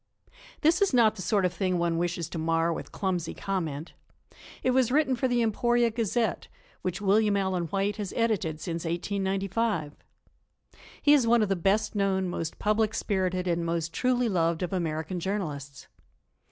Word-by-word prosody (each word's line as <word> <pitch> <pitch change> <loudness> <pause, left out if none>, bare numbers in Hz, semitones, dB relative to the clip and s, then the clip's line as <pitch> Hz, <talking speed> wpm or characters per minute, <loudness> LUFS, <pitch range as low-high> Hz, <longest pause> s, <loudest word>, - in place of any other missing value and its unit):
This 330 +4 +3
is 395 -9 +3
not 220 -3 +5
the 190 - -7
sort 200 0 +1
of 180 - 0
thing 185 0 0
one 170 -1 0
wishes 175 -2 -2
to 165 - -5
mar 165 +1 +1
with - - -7
clumsy 180 -4 -2
comment. 165 -6 -3 0.7
It 255 - +3
was 255 -2 +2
written 275 -2 +3
for 260 +2 0
the 245 -1 +2
Emporia 240 +2 +2
Gazette, 230 0 -1 0.3
which 185 +1 -3
William 205 +1 +3
Allen 190 -3 0
White 200 +4 -1
has 205 -4 -4
edited 210 -10 0
since 165 0 -4
1895. 195 0 -1 1.1
He 290 - +6
is 265 -6 +4
one 235 -1 +5
of 210 - -1
the 195 - +2
best 195 +4 +1
known, 195 -2 +1
most 165 -2 -4
public 215 +1 +1
spirited 185 -4 -1
and 170 -1 0
most 165 -1 -2
truly 250 -1 +1
loved 170 -3 +1
of 180 - -3
American 165 0 -2
journalists. 150 -8 -4
195 Hz, 165 wpm, -28 LUFS, 170-220 Hz, 1.1 s, He